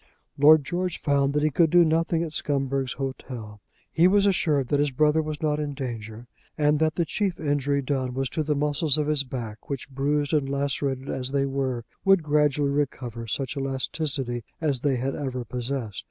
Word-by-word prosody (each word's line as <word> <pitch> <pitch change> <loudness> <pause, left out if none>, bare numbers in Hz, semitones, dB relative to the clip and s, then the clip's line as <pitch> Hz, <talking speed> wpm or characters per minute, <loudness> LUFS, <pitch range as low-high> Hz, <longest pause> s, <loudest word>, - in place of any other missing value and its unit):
Lord 150 +1 +6
George 180 +2 -2
found 140 -1 +1
that 150 0 +1
he 155 - +2
could 165 +3 +3
do 175 +1 +6
nothing 165 +1 +1
at 160 -2 -5
Scumberg's 135 -3 -1
Hotel. 125 -6 -6 0.3
He 170 +2 +5
was 200 +1 +4
assured 155 -9 +2
that 145 - +2
his 145 0 +2
brother 150 +3 +3
was 155 0 -5
not 150 -1 +1
in 145 -2 -3
danger, 115 -3 -6 0.3
and 150 -1 +3
that 155 0 +1
the 170 - +1
chief 195 -1 -1
injury 145 -2 0
done 130 -2 -2
was 135 0 0
to 155 - -2
the 150 0 0
muscles 150 +1 +2
of 150 - +1
his 150 -2 +2
back, 120 -5 -7
which 140 -3 -4
bruised 145 +2 0
and 145 -3 +1
lacerated 140 -1 -2
as 130 -1 -3
they 140 -1 +1
were, 135 -3 -2 0.2
would 195 -3 +4
gradually 150 -1 +2
recover 125 -5 -3
such 135 +6 -3
elasticity 135 -2 -2 0.2
as 145 -5 0
they 140 +1 +1
had 130 +2 -2
ever 130 -4 -4
possessed. 120 -3 -4
140 Hz, 190 wpm, -25 LUFS, 130-150 Hz, 0.3 s, Lord